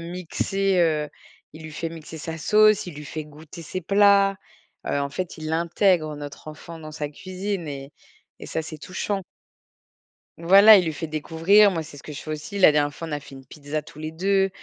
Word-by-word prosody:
mixer, 185 Hz, +2 st, -1 dB
heu, 155 Hz, -3 st, +1 dB, 0.5 s
il 160 Hz, -, -11 dB
lui 155 Hz, -, -8 dB
fait 165 Hz, +2 st, -4 dB
mixer 160 Hz, -1 st, -10 dB
sa 160 Hz, +1 st, -6 dB
sauce, 215 Hz, +5 st, +4 dB
il 175 Hz, -, -8 dB
lui 150 Hz, 0 st, -9 dB
fait 155 Hz, -1 st, -6 dB
goûter 155 Hz, +3 st, -12 dB
ses 185 Hz, +4 st, -5 dB
plats. 200 Hz, +1 st, +4 dB, 0.5 s
Heu, -, -, 0 dB
en 140 Hz, -, -1 dB
fait 170 Hz, +4 st, -5 dB
il 155 Hz, 0 st, -5 dB
intègre 170 Hz, -1 st, +1 dB
notre 145 Hz, 0 st, -9 dB
enfant 165 Hz, +2 st, -10 dB
dans 155 Hz, -1 st, -10 dB
sa 150 Hz, -1 st, -4 dB
cuisine 185 Hz, +3 st, -5 dB
et 140 Hz, -1 st, -7 dB, 0.5 s
et -, -, -8 dB
ça -, -, -3 dB
c'est 160 Hz, 0 st, -8 dB
touchant. 190 Hz, +4 st, -4 dB, 1.1 s
Voilà, 200 Hz, +5 st, +8 dB
il 185 Hz, -, +1 dB
lui 160 Hz, -, -2 dB
fait 160 Hz, +3 st, -5 dB
découvrir. 165 Hz, +7 st, +4 dB
Moi, 165 Hz, -3 st, -3 dB
c'est 150 Hz, -2 st, -12 dB
ce -, -, -13 dB
que 150 Hz, -, -8 dB
je 145 Hz, -, -7 dB
fais 155 Hz, -, -7 dB
aussi. 155 Hz, +7 st, -6 dB
La 185 Hz, -5 st, +7 dB
dernière 145 Hz, -1 st, +1 dB
fois, 165 Hz, -, -7 dB
on -, -, -8 dB
a 145 Hz, -, -2 dB
fait 140 Hz, -1 st, -13 dB
une 135 Hz, 0 st, -13 dB
pizza 150 Hz, 0 st, -5 dB
tous 150 Hz, 0 st, -15 dB
les 155 Hz, 0 st, -5 dB
2, 195 Hz, +3 st, +1 dB
160 Hz, 215 wpm, -24 LUFS, 150-185 Hz, 1.1 s, Voilà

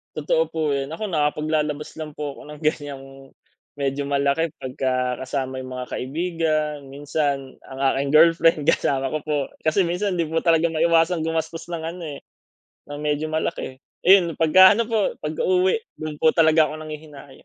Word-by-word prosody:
Totoo -, -, +1 dB
po 155 Hz, -2 st, -2 dB
yun. 140 Hz, +2 st, -2 dB
Ako 210 Hz, +3 st, -4 dB
nakapaglalabas 150 Hz, -1 st, -1 dB
lang 155 Hz, -2 st, -6 dB
po 145 Hz, -2 st, -5 dB
ako -, -, -11 dB
ng 150 Hz, -, -13 dB
ganyang, 145 Hz, -3 st, -2 dB, 0.7 s
medyo 140 Hz, 0 st, -2 dB
malaki 140 Hz, +3 st, 0 dB
pagka 130 Hz, -1 st, -1 dB
kasama 130 Hz, 0 st, -3 dB
yung 130 Hz, 0 st, -7 dB
mga 125 Hz, 0 st, -6 dB
kaibigan, 155 Hz, +1 st, -1 dB, 0.2 s
minsan 140 Hz, -2 st, -2 dB
ang 135 Hz, 0 st, -10 dB
aking 140 Hz, +2 st, -1 dB
girlfriend, 165 Hz, 0 st, +5 dB
kasama 135 Hz, -4 st, +1 dB
ko 155 Hz, -, -1 dB
po. 150 Hz, -1 st, 0 dB, 0.3 s
Kasi 160 Hz, +5 st, +3 dB
minsan 180 Hz, +3 st, -1 dB
'di 165 Hz, -3 st, -1 dB
po 165 Hz, +1 st, -1 dB
talaga 165 Hz, 0 st, +4 dB
maiwasang 165 Hz, +1 st, +2 dB
gumastos 160 Hz, 0 st, -3 dB
ng 165 Hz, -, -3 dB
ano, 170 Hz, +2 st, -6 dB
eh, 145 Hz, -2 st, -7 dB, 0.7 s
ng 145 Hz, -, -6 dB
medyo 150 Hz, +1 st, -1 dB
malaki. 155 Hz, -4 st, -3 dB, 0.2 s
Ayun, 180 Hz, -3 st, +5 dB
pagka 185 Hz, +5 st, +7 dB
ano 230 Hz, +2 st, 0 dB
po, 220 Hz, -3 st, +1 dB
pagka 155 Hz, 0 st, -3 dB
uwi, 185 Hz, +1 st, +3 dB, 0.2 s
do'n 155 Hz, -1 st, -5 dB
po 160 Hz, +1 st, +3 dB
talaga 160 Hz, -1 st, +5 dB
ako 155 Hz, +1 st, -5 dB
nanghihinayang. 150 Hz, -3 st, -10 dB
155 Hz, 165 wpm, -23 LUFS, 140-165 Hz, 0.7 s, pagka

